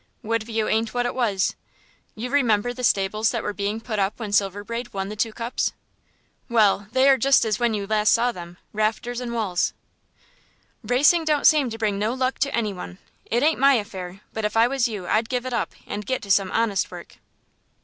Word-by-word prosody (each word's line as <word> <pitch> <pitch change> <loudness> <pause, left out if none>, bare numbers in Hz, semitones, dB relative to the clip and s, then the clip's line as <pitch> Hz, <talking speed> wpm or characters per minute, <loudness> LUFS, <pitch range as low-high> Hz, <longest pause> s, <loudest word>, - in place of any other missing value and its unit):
Woodview 225 0 -1
ain't 225 +2 0
what 245 0 +1
it 245 - -1
was. 215 -6 0 0.6
You 245 +3 -5
remember 245 -4 +2
the 250 +1 -8
stables 215 0 +2
they 235 - -1
were 210 - -3
putting 205 +3 -3 0.2
up 195 +3 -1
when 215 -3 -5
Silver 200 0 +1
Braid 235 +1 -6
won 195 0 -2
the 210 - -6
two 225 +1 0
cups? 230 +2 -2 0.8
Well, 210 -3 +3
they 260 +2 +4
are 270 -1 +5
just 270 0 +4
as 215 -2 0
when 235 -2 +1
you 200 -1 -3
last 215 0 +2
saw 240 +1 +3
them 175 -4 -10 0.2
rafters 225 +3 -1
and 245 -1 -4
walls." 210 -7 0 1.1
"Racing 295 +7 +4
don't 300 -2 +1
seem 295 -5 +5
to 225 - -6
bring 210 -3 -1
no 220 +4 0
luck 260 0 -1
to 280 0 0
any 215 -3 -1
one. 90 - -8 0.3
It 240 +4 +1
ain't 315 -1 +2
my 275 +1 +6
affair, 190 -4 -5
but 220 - -4
if 210 +1 -1
I 230 +1 +6
was 265 -1 +1
you 210 -5 -6
I'd 220 +5 +1
give 250 -1 -2
it 255 - -4
up 235 - -1
and 205 +1 -5
get 260 +5 -2
to 200 - -3
some 195 0 +3
honest 215 -3 0
work." - - -11
225 Hz, 210 wpm, -23 LUFS, 205-245 Hz, 1.1 s, my